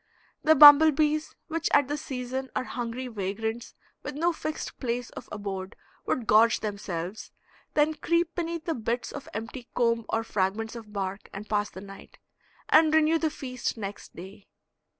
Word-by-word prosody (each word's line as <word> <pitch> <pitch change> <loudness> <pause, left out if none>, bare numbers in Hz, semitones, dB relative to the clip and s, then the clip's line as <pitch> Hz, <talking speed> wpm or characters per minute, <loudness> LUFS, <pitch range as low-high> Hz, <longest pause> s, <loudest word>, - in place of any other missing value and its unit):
The 315 0 +6
bumble 300 +1 +10
bees, 305 +1 0
which 330 0 -1
at 285 -2 +4
this 295 +1 -3
season 260 0 -4
are - - 0
hungry 245 0 -5
vagrants 220 +2 -4 0.3
with 290 - -6
no 335 +3 +1
fixed 310 -1 -5
place 245 -1 -3
of - - -10
abode, 195 -1 -5 0.3
would 245 - -1
gorge 220 +2 +4
themselves, 200 -2 -5 0.4
then 300 +1 +3
creep 335 +2 0
beneath 335 -2 -3
the 330 - 0
bits 235 -1 -3
of 285 - -8
empty 230 +3 -7
comb 230 -2 +1
or 225 - 0
fragments 215 +2 -2
of 225 -3 -10
bark 195 -1 -4
and 210 +2 -7
pass 210 -1 0
the 185 - -10
night, 195 0 -12 0.5
and 315 0 +5
renew 315 +1 +4
the 315 - +1
feast 255 -5 -4
next 205 -2 -7
day. 190 +3 -11
240 Hz, 165 wpm, -27 LUFS, 210-300 Hz, 0.5 s, bumble